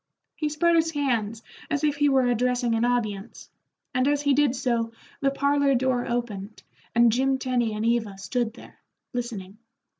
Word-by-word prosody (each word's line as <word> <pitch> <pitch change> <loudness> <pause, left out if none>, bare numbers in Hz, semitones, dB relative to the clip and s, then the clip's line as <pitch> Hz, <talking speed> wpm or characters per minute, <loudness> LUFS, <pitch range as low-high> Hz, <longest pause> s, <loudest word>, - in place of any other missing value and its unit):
He 305 -2 -1
spread 340 +3 +2
his 325 0 +3
hands 230 -7 -1 0.3
as 290 0 -1
if 295 -1 +1
he 290 0 +3
were 265 -2 +3
addressing 245 0 +1
an 225 +1 +1
audience, 230 -4 -2 0.4
and 255 +1 +2
as 290 0 +1
he 285 -1 +3
did 280 -2 +3
so 235 -3 0 0.3
the 275 - +2
parlor 280 0 +2
door 255 -1 +1
opened 220 -4 -4 0.3
and 235 0 +6
Jim 265 +3 +2
Tenny 245 -4 0
and 215 +1 -2
Eva 225 -4 0
stood 235 +3 -2
there, - - -15 0.3
listening. 215 -5 -5
245 Hz, 170 wpm, -25 LUFS, 230-275 Hz, 0.4 s, and